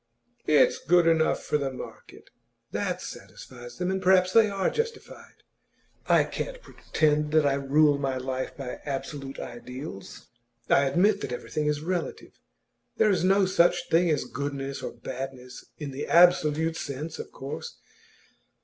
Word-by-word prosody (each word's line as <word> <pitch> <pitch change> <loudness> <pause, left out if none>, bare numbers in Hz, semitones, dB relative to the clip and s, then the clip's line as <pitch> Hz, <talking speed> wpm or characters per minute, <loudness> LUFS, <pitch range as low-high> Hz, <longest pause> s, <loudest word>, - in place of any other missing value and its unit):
"It's 155 -1 +4
good 175 0 +3
enough 165 -1 +2
for 150 - 0
the 135 -2 -2
market"; 130 - -11 0.4
that - - -2
satisfies 120 -1 -10
them. 180 +1 -1
And 190 0 -2
perhaps 185 0 +4
they 225 -2 +6
are 195 -2 0
justified. 460 0 -6 0.6
I - - +5
can't - - -5
pretend 150 - 0
that 155 -2 +4
I 140 - +3
rule 140 +1 +3
my 135 -2 -1
life 130 0 -4
by 130 -3 -6
absolute 140 -1 -5
ideals; 125 -2 -8 0.4
I 140 - +4
admit 195 +8 +2
that 125 - -4
everything 150 +4 -3
is 150 0 0
relative. 175 +1 -4 0.7
There 215 - +4
is 185 -3 +1
no 195 +1 +4
such 175 -1 +2
thing 170 +1 +3
as 150 - +1
goodness 140 -1 -4
or - - -4
badness, 130 -1 -8
in 145 -3 -6
the 135 +2 -5
absolute 165 -2 +4
sense, 150 +3 -5
of - - -7
course. 135 +2 -7
150 Hz, 150 wpm, -27 LUFS, 135-180 Hz, 0.7 s, they